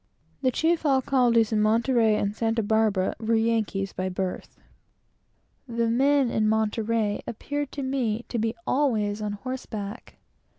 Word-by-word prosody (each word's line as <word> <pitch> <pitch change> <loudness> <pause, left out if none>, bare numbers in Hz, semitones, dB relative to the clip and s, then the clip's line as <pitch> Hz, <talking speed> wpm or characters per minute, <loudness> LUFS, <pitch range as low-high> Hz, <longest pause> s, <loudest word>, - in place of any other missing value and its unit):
The 260 - +3
chief 325 +6 +1
alcaldes 255 -5 +3
in 210 - +2
Monterey 225 0 +3
and 205 0 -1
Santa 225 0 0
Barbara 210 -3 +1
were 225 +1 +1
both 225 0 +2
Yankees 215 -4 -1
by 185 0 -2
birth. 185 0 -5 1.1
The 230 -1 0
men 270 +1 +3
in 215 -1 +1
Monterey 220 -1 0
appeared 290 +5 -4
to 280 - -4
me 245 -4 -1
to 235 - -2
be 225 +1 -1
always 215 -7 0
on 210 -1 -2
horseback. 220 -2 -6
225 Hz, 140 wpm, -26 LUFS, 215-255 Hz, 1.1 s, The